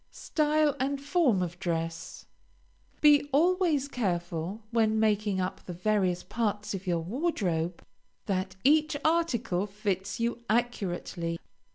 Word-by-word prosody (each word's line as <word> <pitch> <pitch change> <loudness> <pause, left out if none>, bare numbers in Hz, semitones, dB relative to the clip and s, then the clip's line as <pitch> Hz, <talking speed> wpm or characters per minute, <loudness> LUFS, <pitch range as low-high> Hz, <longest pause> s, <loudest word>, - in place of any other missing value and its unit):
STYLE 305 -1 +1
AND 275 +2 0
FORM 280 - +2
OF 175 0 -5
DRESS 165 -2 -3 0.8
Be 290 -1 +6
always 325 -1 +3
careful 180 - -2
when 220 -2 +2
making 210 -2 +1
up 185 0 -3
the 180 - -7
various 180 -1 +1
parts 210 -3 -2
of 195 0 -6
your 170 -2 +1
wardrobe, 180 - -1 0.4
that 190 -1 -2
each 305 +1 +4
article 250 - +1
fits 200 -1 -3
you 235 0 -1
accurately. 190 -7 -1
210 Hz, 120 wpm, -29 LUFS, 180-280 Hz, 0.8 s, Be